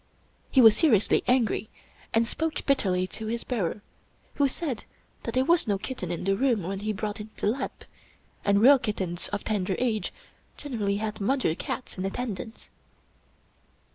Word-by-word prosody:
He 265 - +5
was 225 -3 +8
seriously 230 - +3
angry, 235 -4 +2 0.4
and 225 +1 +3
spoke 320 +7 -2
bitterly 190 -10 +2
to 215 +4 -7
his 235 +1 -2
bearer, 210 -4 -2 0.5
who 285 - +3
said 270 -4 -4 0.4
that 230 - -5
there 260 +1 +3
was 335 -2 +3
no 200 -2 +2
kitten 195 -3 -5
in 175 - -3
the 195 +1 +2
room 235 -3 +2
when 190 +3 -3
he 215 +2 -2
brought 210 0 -4
in 210 +1 -7
the - - -3
lamp, 255 +6 -2 0.6
and 200 +1 +3
real 275 +2 +8
kittens 190 -7 -3
of 205 -1 -4
tender 195 -3 -1
age 230 -4 0 0.5
generally 215 -8 -2
had 215 0 -4
mother 255 - +1
cats 195 +4 -5
in 185 - -1
attendance. 220 0 -5
215 Hz, 165 wpm, -27 LUFS, 200-255 Hz, 0.6 s, was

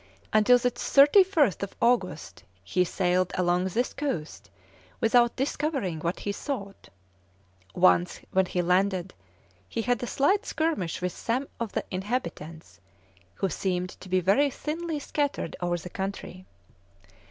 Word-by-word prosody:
Until 215 +3 +6
the 245 0 0
31st 285 - +4
August, 245 +1 0 0.2
he 180 - +1
sailed 180 0 0
along 180 0 +2
this 230 +7 -1
coast 150 - -4 0.5
without 235 +1 +3
discovering 270 - -2
what 170 +3 -3
he 205 - -2
sought. 200 -3 -6 0.9
Once 90 0 +3
when 190 -1 +2
he 180 0 -1
landed, 185 +1 +1 0.6
he 225 - -2
had 245 0 0
a 245 - -3
slight 380 - +2
skirmish 310 - -2
with 180 - 0
some 255 +4 -2
of 230 -3 -4
the - - -2
inhabitants, 185 -6 -5 0.6
who 195 - -1
seemed 180 +1 -2
to 185 - -11
be 185 0 +3
very 230 - +3
thinly 315 +3 -4
scattered 285 - -2
over 175 0 0
the 175 - -8
country. 190 -1 -6
200 Hz, 130 wpm, -27 LUFS, 180-270 Hz, 0.9 s, Until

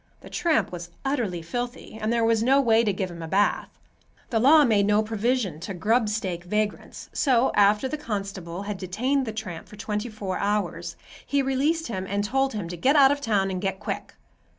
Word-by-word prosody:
The - - -13
tramp 330 -3 +1
was 175 -1 -7 0.2
utterly 225 - -1
filthy 245 +6 -5
and 215 +1 0
there 235 -1 +2
was 225 -1 +3
no 265 +4 +4
way 230 -4 +4
to 210 - +2
give 190 -1 -3
him 170 -1 -9
a 165 - -5
bath. 200 +5 +1 0.6
The 225 - +2
law 290 +5 +7
made 205 -4 +3
no 210 +1 +3
provision 220 -5 -1
to 190 +3 -6
grub 220 +5 +2
stake 185 -5 -3
vagrants, 210 +3 -3
so 260 -3 +3
after 210 +4 +4
the 305 +3 -4
constable 195 - -5
had 205 -1 -5
detained 250 +9 -1
the - - -2
tramp 210 -7 -6
for - - -12
twentyfour 210 -2 -4
hours, 205 +1 -1 0.3
he 280 -1 0
released 290 +5 +1
him 190 -5 -4
and 200 +1 0
told 270 +5 0
him 205 -5 -4
to 175 - -5
"get 270 - +3
out 275 -2 +7
of 285 0 -1
town, 200 -6 +1
and 185 -1 -3
get 195 -1 -2
quick." 205 - -5
215 Hz, 200 wpm, -25 LUFS, 195-250 Hz, 0.6 s, law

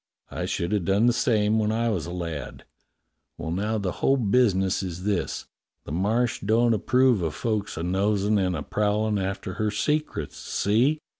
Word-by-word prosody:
I - - -3
should 85 +1 -2
have 105 -4 +1
done 100 +5 +2
the 120 - +4
same 110 -2 +2
when 105 0 +1
I 115 +1 0
was 90 -7 -2
a - - -6
lad. 85 -4 -6 0.7
W^ell, 80 - -3
now 105 +4 -1
the 100 -3 -2
whole 135 - +4
business 100 -5 +2
is 90 -1 -5
this: 100 -2 -1 0.4
the - - -9
Marsh 110 +8 0
don't 115 +3 +3
approve 125 0 +3
of 80 -3 -2
folks 105 -5 -2
a 80 - -3
nosin' 100 +3 +1
and 90 -2 0
a 75 - -4
prowlin' 105 +2 0
after 95 0 -3
her 110 - +1
secrets, 150 +9 -2
see?" 125 +10 +1
105 Hz, 175 wpm, -25 LUFS, 95-115 Hz, 0.7 s, the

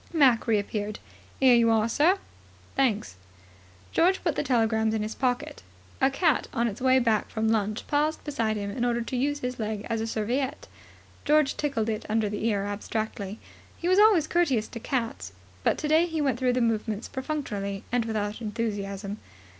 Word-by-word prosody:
Mac 265 -9 +4
reappeared. 210 -1 -1 0.4
"Here 260 -2 +6
you 235 -1 +5
are, 220 -1 +3
sir." 310 - +3 0.6
"Thanks." 210 - 0 0.7
George 370 +3 +2
put 330 -5 0
the - - 0
telegrams 220 -3 +1
in 215 - -1
his 215 +1 -4
pocket. 250 -2 -2 0.4
A 270 - +5
cat, 305 +3 +1
on 235 -2 +1
its 210 0 -5
way 260 0 +5
back 230 -4 +1
from 220 0 0
lunch, 215 0 0
paused 300 +1 0
beside 225 -8 -1
him 200 -1 -3
in 240 +4 -3
order 240 -1 +1
to 255 - -5
use 285 +3 0
his 250 0 -4
leg 215 -1 -3
as 225 -1 0
a 225 - -2
serviette. 245 +5 -2 0.6
George 300 -1 +3
tickled 275 -7 -1
it 220 0 -3
under 215 -1 +1
the 210 +2 -2
ear 200 -3 0
abstractedly. 205 0 -4 0.4
He 340 - -3
was 370 +2 +4
always 415 -7 +6
courteous 285 -11 +1
to 230 - -7
cats, 230 - -3 0.3
but - - +2
today 315 +3 +3
he 325 -2 -3
went 270 -5 0
through 255 -1 +2
the 250 - +1
movements 220 -1 -1
perfunctorily 225 -9 -4
and 245 -1 +1
without 215 0 -3
enthusiasm. 205 -2 -3
230 Hz, 180 wpm, -27 LUFS, 215-270 Hz, 0.7 s, Here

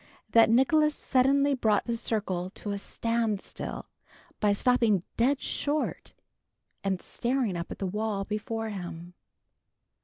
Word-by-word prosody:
that 230 -1 +6
Nicholas 295 +6 +4
suddenly 275 +2 +3
brought 220 -6 +2
the 235 - -1
circle 195 -6 -2
to 205 +1 -6
a 200 - -2
stand 230 -1 -1
still - - -6 0.5
by 210 - +3
stopping 220 -3 +3
dead 265 +4 +2
short, 295 +1 -1 0.7
and 195 -2 0
staring 240 -4 -1
up 170 0 -4
at - - -6
the 195 - -3
wall 205 +1 -2
before 220 +2 -3
him. 175 -3 -7
220 Hz, 130 wpm, -28 LUFS, 200-250 Hz, 0.7 s, that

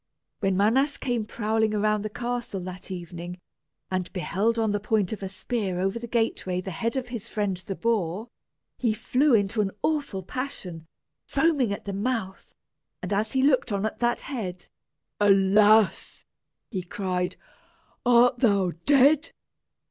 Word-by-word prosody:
When 195 -3 +1
Manas 260 +8 +3
came 240 -4 -1
prowling 220 0 0
around 210 0 +1
the 215 - -3
castle 240 -2 -3
that 185 0 -7
evening, 175 -1 -6 0.5
and 185 -1 -2
beheld 205 +5 0
on 220 -2 +1
the 205 - 0
point 210 -1 0
of 215 - -6
a 195 - -4
spear 195 -2 -2
over 195 +5 0
the 235 - -7
gateway 225 -5 0
the 190 +1 -5
head 230 +8 -2
of 250 -2 -3
his 235 -2 -5
friend 205 -4 -1
the 185 +2 -6
boar, 215 -2 -1 0.5
he 230 -4 +1
flew 250 +4 +3
into 210 +1 +1
an 200 - 0
awful 290 -12 -1
passion, 180 - -5 0.4
foaming 280 -6 +2
at 200 - -5
the 200 - -4
mouth; 200 -2 -3 0.5
and - - -2
as 215 +2 0
he 265 -1 +2
looked 265 -4 +3
on 200 +1 0
that 240 0 +1
head 185 -10 -5 0.5
"Alas!" 205 +1 +4 0.5
he 190 -5 -2
cried, 180 0 -2 0.7
"art 245 0 +5
thou 200 -7 +3 0.2
dead? 285 +3 +5
210 Hz, 150 wpm, -26 LUFS, 190-240 Hz, 0.7 s, art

